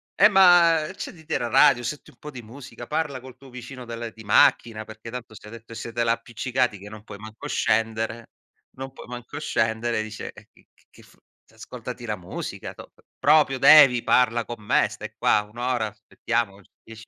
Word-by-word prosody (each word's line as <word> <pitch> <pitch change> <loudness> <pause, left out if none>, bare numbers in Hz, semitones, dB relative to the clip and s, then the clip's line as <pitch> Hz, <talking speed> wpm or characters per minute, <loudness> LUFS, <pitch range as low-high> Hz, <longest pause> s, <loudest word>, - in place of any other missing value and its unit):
eh, 210 +2 +6
ma 175 -4 +6
accenditi 160 +1 -6
la 120 - -3
radio, 135 -1 +5
senti 140 +5 -6
un - - -28
po' 150 - -9
di 125 - -9
musica, 120 +1 -11
parla 145 -5 -2
col 130 -1 -12
tuo 135 0 -16
vicino 125 +1 -9
del 115 -1 -7
di 110 - -13
macchina, 110 +1 +3
perché 110 +1 -11
tanto 120 -2 -8
se - - -13
ha 105 - -11
detto 115 0 -12
siete 115 +1 -3
là 115 - +3
appiccicati, 120 0 -2
che 100 - -11
non 110 0 -11
puoi 100 - -10
manco 110 +1 -9
scendere, 115 +1 -1 0.5
non 135 0 -7
puoi - - -12
manco 125 +3 -8
scendere, 110 -3 0
dice, 110 0 -7
eh, - - -16
che - - -25 0.2
che - - -18
f - - -22 0.4
ascoltati - - -9
la - - -2
musica, - - -7
top - - -15 0.2
proprio 145 -4 +4
devi, 135 -4 +8
parla 120 -1 +2
con 120 -3 -8
me, - - +3
stai - - -9
qua 105 - +2
1 105 +2 -18
ora, 120 -2 -1
aspettiamo 100 0 -4 0.2
10 115 0 -12
120 Hz, 190 wpm, -24 LUFS, 110-130 Hz, 0.5 s, devi